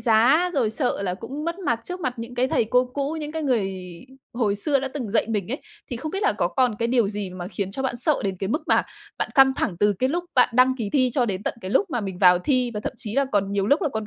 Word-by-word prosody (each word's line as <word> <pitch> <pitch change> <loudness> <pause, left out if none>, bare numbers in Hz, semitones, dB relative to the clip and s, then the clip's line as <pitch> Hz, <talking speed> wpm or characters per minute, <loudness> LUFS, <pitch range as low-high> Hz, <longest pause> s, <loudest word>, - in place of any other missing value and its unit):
giá 255 +10 +4
rồi 245 -7 +1
sợ 245 -3 -1
là 180 -2 -1
cũng 265 +9 -7
mất 335 +2 -3
mặt 235 -12 -1
trước 360 +1 -5
mặt 255 -6 -2
những 230 +2 -7
cái 250 +2 +1
thầy 230 - +2
cô 250 +3 +3
cũ, 285 +3 -2
những 300 0 -5
cái 320 0 -3
người 225 -9 0 0.6
hồi 225 -4 0
xưa 275 +7 +1
đã 270 - -3
từng 260 -6 -5
dạy 220 - +2
mình 210 0 -2
ấy, 275 - -3 0.3
thì 245 - -2
không 310 +6 -5
biết 390 +4 -3
là 415 - +3
có - - 0
còn 250 -4 +1
cái 230 - 0
điều 235 -4 +2
gì 205 -2 -4
mà 180 -1 -7
khiến 200 -2 -3
cho 265 +7 -4
bạn 260 -2 -1
sợ 285 +5 +2
đến 195 -1 -1
cái 195 - -3
mức 300 +9 -1
mà - - +4 0.4
bạn - - -1
căng 270 -1 +6
thẳng 175 - -1
từ 205 0 +4
cái 250 +7 0
lúc 345 +5 -1
bạn 250 - +5
đăng 255 +2 +4
ký 220 -5 -3
thi 255 -3 +3
cho 255 -1 +2
đến 195 -2 -3
tận - - -2
cái 185 - -6
lúc 390 - +2
mà 245 -4 -1
mình 190 -3 -5
vào 180 -2 +6
thi 250 +5 +1
và 210 - -3
thậm - - -4
chí 215 -1 -4
là 275 +1 +3
còn 200 -1 +1
nhiều 200 -1 0
lúc 285 +7 +3
là - - +2
còn 220 -5 -4
240 Hz, 300 wpm, -24 LUFS, 205-275 Hz, 0.6 s, căng